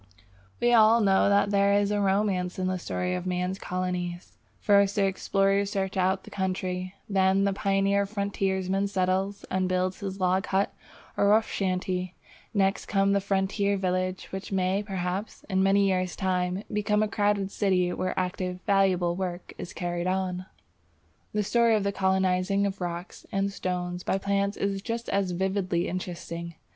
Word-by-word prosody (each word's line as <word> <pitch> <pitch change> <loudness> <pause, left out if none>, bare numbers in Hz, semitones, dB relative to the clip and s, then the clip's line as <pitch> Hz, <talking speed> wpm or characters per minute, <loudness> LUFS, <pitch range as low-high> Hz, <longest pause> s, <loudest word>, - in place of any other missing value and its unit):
We 240 0 +3
all 225 0 +6
know 195 -2 +4
that 200 0 +3
there 200 0 +3
is 205 0 +2
a 205 0 +1
romance 190 -2 +1
in 185 - -1
the 185 0 -1
story 180 +1 -2
of 180 0 -3
man's 180 +1 -1
colonies. 180 -1 -4 0.2
First 200 -1 +4
the 200 - +3
explorer 195 +1 +1
searches 195 -1 -2
out 190 0 +1
the - - -13
country; 185 -1 -3
then 190 -1 +3
the 200 0 +2
pioneer 195 +1 +1
frontiersman 195 -1 -1
settles 195 +1 -1
and 185 0 0
builds 185 0 0
his 195 -1 -5
log 185 +1 +1
hut 195 +1 +1 0.4
or 200 - +2
rough 215 +2 +4
shanty. 185 -1 -2 0.4
Next 195 -1 +1
comes 195 -1 +2
the 200 - +2
frontier 200 +1 0
village, 185 0 -1
which 190 +1 -6
may 190 +1 +1
perhaps 190 0 -4
in 190 -2 +1
many 195 +1 +4
years' 185 -1 0
time 185 0 -1
become 210 0 +2
a - - +1
crowded 205 -1 0
city 180 -3 +1
where 185 0 -2
active, 180 0 -3
valuable 185 -3 +2
work 180 -1 -5
is 180 - -6
carried 175 0 -3
on. 185 0 -2 0.8
The 210 0 0
story 235 +2 +3
of 210 - +1
the 200 - 0
colonizing 190 0 +1
of 195 -1 -3
rocks 175 0 -5
and 195 0 0
stones 180 -1 -3
by 190 - 0
plants 200 +1 0
is 195 -1 -1
just 230 +2 -4
as 195 -1 +1
vividly 185 -1 -1
interesting. 170 -2 -5
190 Hz, 165 wpm, -27 LUFS, 185-200 Hz, 0.8 s, all